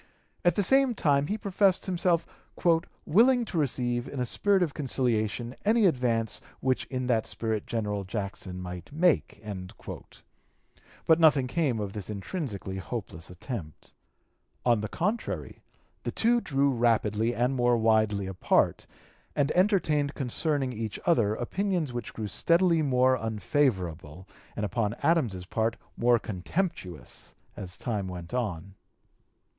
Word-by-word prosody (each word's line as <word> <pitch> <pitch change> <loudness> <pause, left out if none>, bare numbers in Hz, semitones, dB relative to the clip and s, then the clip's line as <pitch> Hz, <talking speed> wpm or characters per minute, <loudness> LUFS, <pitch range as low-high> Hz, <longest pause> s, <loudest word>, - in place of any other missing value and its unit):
At 175 - +4
the 205 - +2
same 265 +3 +3
time 145 -5 +2
he 210 - -1
professed 195 -2 +2
himself 175 -2 +1 0.8
"willing 240 +6 +4
to 180 - -5
receive 120 -3 0
in 140 - -6
a 125 - +1
spirit 195 - +2
of 155 -5 -2
conciliation 120 -3 -1
any 220 +1 +4
advance 120 - +1 0.2
which 130 -1 0
in 130 -1 -3
that 115 -3 +1
spirit 110 -2 -2
General 105 -3 -2
Jackson 95 -2 -5
might 90 +3 -7
make." 165 +2 +2 1.7
But 160 0 +5
nothing 150 -5 +5
came 130 -4 0
of 100 -2 -4
this 105 -2 -6
intrinsically 100 - -4
hopeless 95 -5 -6
attempt. 90 - -7 0.7
On 120 -3 +4
the 110 - -2
contrary 205 - -3 0.4
the - - -3
two 235 +1 +2
drew 140 -4 +1
rapidly 115 -1 +1
and 125 +3 +1
more 120 -1 +3
widely 110 -3 +2
apart, 95 -1 +1 0.5
and 145 0 +2
(p. - - 0
241) - - +3
entertained 160 -8 +2
concerning 135 0 -1
each 110 -2 -4
other 115 -11 +3
opinions 175 - -1
which 120 -2 -5
grew 110 - -3
steadily 170 - +3
more 130 -2 +3
unfavorable, 95 - -1 0.3
and 105 - -1
upon 105 +2 -1
Adams's 120 - +1
part 110 +4 0 0.2
more 120 0 +4
contemptuous, 100 - -4 0.2
as 90 -2 -6
time 105 -5 -2
went 90 0 -7
on. 100 -7 -3
120 Hz, 135 wpm, -28 LUFS, 105-160 Hz, 1.7 s, But